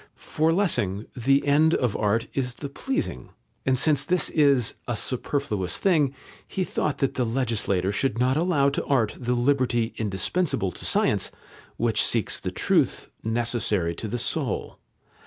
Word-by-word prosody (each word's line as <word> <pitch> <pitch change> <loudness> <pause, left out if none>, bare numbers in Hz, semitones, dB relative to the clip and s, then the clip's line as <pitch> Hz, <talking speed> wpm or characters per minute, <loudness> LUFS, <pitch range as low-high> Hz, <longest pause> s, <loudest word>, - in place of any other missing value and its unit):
For 160 +1 0
Lessing, 110 - 0
the 135 +3 +2
end 155 +3 +4
of 120 -5 0
art 110 +2 +1
is 125 -2 -2
the 140 - -6
pleasing, 140 - -3 0.4
and 130 -1 +3
since 145 0 +3
this 180 +5 +1
is 140 -7 +3
"a 120 - -1
superfluous 110 -6 -1
thing," 150 -8 +2 0.3
he 190 - -2
thought 150 -4 -2
that 135 - 0
the 125 - 0
legislator 115 -6 0
should 115 +2 -1
not 125 +2 +2
allow 155 -4 +2
to - - -2
art 120 -7 +1
the 125 0 -1
liberty 120 -2 +1
indispensable 105 - 0
to - - -9
science, - - +2 0.5
which 115 -3 +1
seeks 115 -4 +1
the - - -3
truth, - - +1
necessary 110 -6 0
to 110 - -5
the 115 +4 -3
soul. - - -2
125 Hz, 155 wpm, -25 LUFS, 110-145 Hz, 0.5 s, end